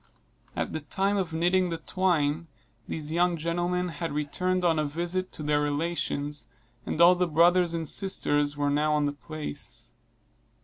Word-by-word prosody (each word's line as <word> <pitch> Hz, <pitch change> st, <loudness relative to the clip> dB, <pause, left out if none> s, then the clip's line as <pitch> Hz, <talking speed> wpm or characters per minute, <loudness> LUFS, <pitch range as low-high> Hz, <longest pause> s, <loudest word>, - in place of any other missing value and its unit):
At -, -, -2 dB
the 155 Hz, -, -3 dB
time 195 Hz, +7 st, 0 dB
of 185 Hz, -4 st, -1 dB
knitting 180 Hz, +3 st, +2 dB
the 165 Hz, -, -2 dB
twine, 165 Hz, -4 st, 0 dB, 0.4 s
these 155 Hz, -1 st, -4 dB
young 175 Hz, +1 st, +2 dB
gentlemen 175 Hz, +2 st, -1 dB
had 165 Hz, +1 st, -4 dB
returned 180 Hz, +5 st, -1 dB
on 165 Hz, -2 st, +3 dB
a -, -, +2 dB
visit 175 Hz, +5 st, -2 dB
to 155 Hz, -, -6 dB
their 150 Hz, 0 st, +2 dB
relations, 145 Hz, -1 st, -2 dB, 0.4 s
and -, -, -2 dB
all 170 Hz, +1 st, +8 dB
the 180 Hz, 0 st, +1 dB
brothers 170 Hz, +2 st, +4 dB
and 165 Hz, -1 st, -2 dB
sisters 145 Hz, -6 st, 0 dB
were 145 Hz, 0 st, +1 dB
now 150 Hz, +1 st, +2 dB
on 150 Hz, -1 st, +2 dB
the 145 Hz, -, -1 dB
place. 150 Hz, -, -7 dB
165 Hz, 165 wpm, -27 LUFS, 150-180 Hz, 0.4 s, all